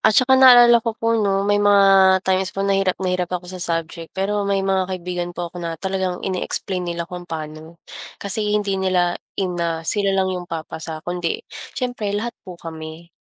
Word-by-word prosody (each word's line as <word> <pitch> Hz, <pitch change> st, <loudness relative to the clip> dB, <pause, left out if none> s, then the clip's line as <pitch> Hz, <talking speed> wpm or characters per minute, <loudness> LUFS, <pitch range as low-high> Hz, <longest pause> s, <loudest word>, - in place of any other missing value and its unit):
at 220 Hz, -1 st, +3 dB
saka 260 Hz, +1 st, +5 dB
naalala 245 Hz, -2 st, +8 dB
ko 230 Hz, -1 st, -3 dB
po 230 Hz, 0 st, 0 dB
'no 200 Hz, -3 st, +1 dB
may 205 Hz, 0 st, +2 dB
mga 195 Hz, -2 st, +5 dB
times 190 Hz, 0 st, +1 dB
po 195 Hz, -, 0 dB
na 200 Hz, -, +2 dB
hirap 195 Hz, -1 st, +1 dB
na 185 Hz, -1 st, -2 dB
hirap 180 Hz, -1 st, -1 dB
ako 180 Hz, -, -11 dB
sa 185 Hz, -, -7 dB
subject 165 Hz, -1 st, -3 dB
pero 200 Hz, +1 st, -1 dB
may 195 Hz, -1 st, +1 dB
mga 190 Hz, -1 st, +1 dB
kaibigan 175 Hz, -1 st, -4 dB
po 175 Hz, -1 st, -5 dB
ako 175 Hz, -, -7 dB
na 165 Hz, -1 st, -4 dB
talagang 190 Hz, 0 st, -3 dB
ini-explain 185 Hz, -1 st, -2 dB
nila 170 Hz, 0 st, -3 dB
kung 175 Hz, 0 st, -9 dB
paano. 155 Hz, +1 st, -7 dB, 0.4 s
Kasi 210 Hz, +1 st, -1 dB
hindi 200 Hz, -2 st, -1 dB
nila 180 Hz, -2 st, +2 dB, 0.2 s
ina 170 Hz, -3 st, -2 dB
sila 200 Hz, +2 st, 0 dB
lang 190 Hz, -1 st, +1 dB
yung 180 Hz, -1 st, -6 dB
papasa 160 Hz, -1 st, -6 dB
kundi, 175 Hz, -1 st, -2 dB, 0.4 s
siyempre 235 Hz, -6 st, -2 dB
lahat 235 Hz, +3 st, -3 dB, 0.2 s
po 180 Hz, -, -8 dB
kami. 160 Hz, 0 st, -9 dB
185 Hz, 190 wpm, -21 LUFS, 175-200 Hz, 0.4 s, naalala